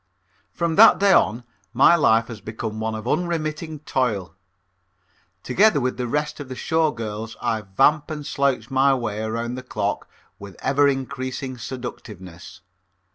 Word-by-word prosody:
From 170 -2 -2
that 225 - +8
day 200 -1 +4
on 115 -4 +2 0.3
my 135 +7 +6
life 115 -8 +3
has 115 -3 -9
become 110 0 -6
one 110 0 -2
of 110 +1 -7
unremitting 155 -2 -2
toil. 105 - -1 1.1
Together 175 +4 +3
with 130 -1 -2
the 125 -1 -2
rest 150 +4 -2
of 140 -2 -8
the 130 - -6
Show 160 +3 +1
Girls 110 -3 -6
I 110 -1 -1
vamp 135 +11 +2
and 150 -2 -6
slouch 135 -5 -1
my 135 +1 +3
way 110 -4 -3
around 115 +2 -3
the 130 - -5
clock 110 -5 -3 0.3
with 100 -2 -10
ever 140 +2 +3
increasing 130 -1 -3
seductiveness. 105 -8 -9
130 Hz, 150 wpm, -22 LUFS, 110-150 Hz, 1.1 s, that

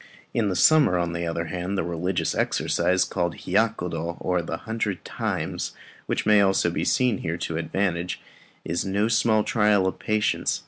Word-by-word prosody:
In 105 -5 0
summer, 145 - +5
on 85 -1 -1
the 85 0 -3
other 85 0 -2
hand, 90 +3 -3
the - - 0
religious 85 +2 -1
exercise 90 +2 +1
called 85 -2 -2
Hiyakudo, 90 -5 -1
or 90 -1 0
"the 80 0 -4
hundred 110 -5 -3
times," - - -3 0.3
which - - -1
may 105 -1 +6
also 95 -3 +2
be - - -2
seen 125 -3 +2
here 80 +1 -3
to 85 - -4
advantage, 90 0 -1 0.5
is 85 +1 -1
no 100 +2 0
small 115 -2 +3
trial 105 -4 +3
of 95 - -2
patience. 110 0 0
95 Hz, 165 wpm, -25 LUFS, 85-105 Hz, 0.5 s, may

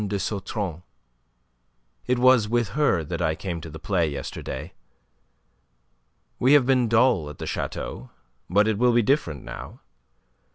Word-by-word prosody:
de 100 - -2
Sautron. 95 -3 -3 1.3
It 125 0 +2
was 125 -3 +4
with 120 -3 +1
her 100 - +1
that 85 +2 -4
I 80 -2 +1
came 85 0 -5
to 80 - -8
the 80 - -9
play 85 -1 0
yesterday. 70 +3 -6 1.7
We 130 +3 +4
have 145 -4 +6
been 130 -2 +3
dull 110 - +3
at 75 - -10
the - - -6
chateau; 65 - -5 0.4
but 100 +4 +3
it 110 -2 0
will 125 0 +4
be 120 0 +4
different 95 - 0
now. - - -9
100 Hz, 150 wpm, -25 LUFS, 80-120 Hz, 1.7 s, have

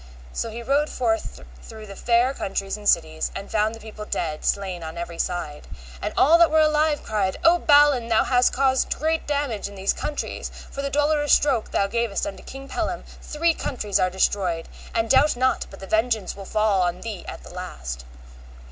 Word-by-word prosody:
So 230 - -2
he 235 +2 -7
rode 285 +4 +1
forth 225 - -2 0.2
through 220 -1 -10
the 200 -1 -10
fair 240 +4 +2
countries 195 -4 -3
and 210 -1 -1
cities, 160 -2 +1
and 195 - -7
found 215 +1 +1
the - - -12
people 215 -1 -9
dead, 155 -7 -3
slain 190 -3 -1
on 160 +1 -7
every 170 0 -6
side. 165 -5 -3 0.3
And - - -2
all 325 +5 +6
that 340 - +6
were 315 - +3
alive 305 -1 +2
cried, 200 -3 -1
O 345 +1 +6
Balin, 285 -6 +5
thou 225 -1 +3
hast 250 -1 +3
caused 265 -1 +1
great 320 +2 -1
damage 280 -9 -1
in 200 - -11
these 195 0 0
countries; 295 - -4 0.2
for 275 - -4
the 280 - -2
dolorous 295 +1 +2
stroke 265 -7 +2
thou 200 - +1
gavest 235 +2 -1
unto 300 - -6
King 270 +1 -10
Pellam 345 +3 -3 0.2
three 330 +2 +1
countries 210 -10 -2
are 185 - +3
destroyed, 185 -2 0 0.3
and 225 0 +1
doubt 270 +4 +4
not 255 +1 +1
but 195 - -12
the 195 - -8
vengeance 220 0 0
will 195 - -9
fall 215 -2 +2
on 175 0 -1
thee 215 -5 -6
at - - -8
the - - -12
last. - - -6
225 Hz, 195 wpm, -24 LUFS, 195-285 Hz, 0.3 s, all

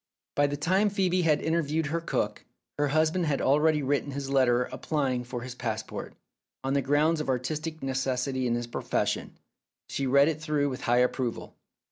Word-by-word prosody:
By 145 0 +3
the 145 0 -3
time 190 +8 +2
Phcebe 185 -2 +1
had 150 -2 +3
interviewed 160 -1 0
her 165 +3 -1
cook, - - -2 0.4
her 145 - +3
husband 160 +4 +2
had 140 -2 +1
already 150 +2 +3
written 140 +1 0
his 135 0 -4
letter 125 -2 +4
applying 130 -3 -2
for 120 0 -6
his 125 -1 -6
passport, 110 -3 -5 0.5
on 135 0 0
the 140 - +2
grounds 150 +4 +2
of 150 - -4
artistic 155 +5 -2
necessity 130 -1 -1
in 120 - +1
his 120 0 -2
profession. 120 - -2 0.5
She 135 - -2
read 140 +2 +5
it 155 -1 -1
through 150 -2 0
with 130 - -5
high 120 +1 +2
approval. 125 -1 -1
140 Hz, 175 wpm, -28 LUFS, 130-155 Hz, 0.5 s, read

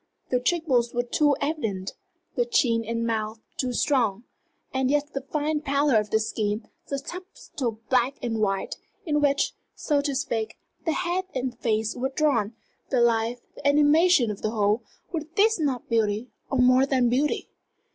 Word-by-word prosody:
The 250 - +3
cheek 325 +7 0
bones 240 -5 +1
were 245 - +2
too 285 +4 +2
evident, 225 - -2 0.4
the 485 - +3
chin 260 - +2
and 230 +1 -2
mouth 220 -1 -2 0.2
too 255 -1 -1
strong. 235 -5 +1 0.5
And 265 -1 +1
yet 295 +1 0
the 275 - -2
fine 300 +2 -1
pallor 280 -3 +2
of 210 0 -3
the 220 - +3
skin, 215 0 -2 0.2
the 275 - -2
subtle 280 - -6
black 255 +1 +2
and 230 -2 -2
white, 195 -2 -1 0.3
in 295 -3 +1
which, 280 -1 +2 0.2
so 290 -2 +1
to 285 -1 -2
speak, 225 -4 -2 0.3
the 325 - +1
head 360 +2 -1
and 255 -1 -2
face 220 -2 0
were 260 +2 -1
drawn, 265 -7 +1 0.3
the 260 - +2
life, 235 0 +2
the 285 - -3
animation 295 -2 +5
of 205 - -7
the 215 - 0
whole 210 +1 +1 0.3
were 330 -3 -1
these 435 -1 +4
not 275 -5 -1
beauty, 220 +1 0 0.2
or 270 - 0
more 255 +1 +5
than 260 -3 +3
beauty? 265 +5 +1
255 Hz, 170 wpm, -26 LUFS, 225-295 Hz, 0.5 s, animation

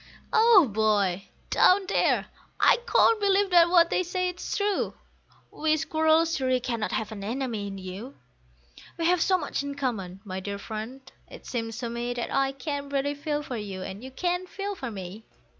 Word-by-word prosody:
Oh 440 - +6
boy, 205 -4 +1 0.2
down 380 +1 +5
there, - - +2 0.3
I - - +6
can't 455 - +4
believe 400 -1 +2
that 345 -1 +6
what 340 -1 +5
they - - +2
say 365 +1 -1
is 360 - -4
true! 410 -1 0 0.6
We 310 0 +1
squirrels 320 +1 +2
surely 255 -1 +1
cannot 235 -3 -3
have 220 0 -2
an 205 -2 -7
enemy 230 -2 -3
in 195 -1 -6
you; 195 +8 -8 0.8
We 335 - -1
have 355 0 +3
so 375 +2 +3
much 295 -5 -3
in 285 0 -5
common, 205 -10 -3
my 190 -1 -4
dear 200 +1 -5
friend, 220 +5 -7 0.3
it - - -12
seems 225 -2 -4
to 240 -2 -4
me 240 +1 -3
That 240 - -4
I 270 0 +2
can 280 +1 -5
really 280 +1 0
feel 295 +1 -3
for 255 -4 -5
you, 195 -3 -6
and 195 +5 -7
you 260 - -7
can 355 +6 -2
feel 400 +2 -4
for 265 -10 -6
me. 195 0 -8
270 Hz, 185 wpm, -27 LUFS, 215-335 Hz, 0.8 s, Oh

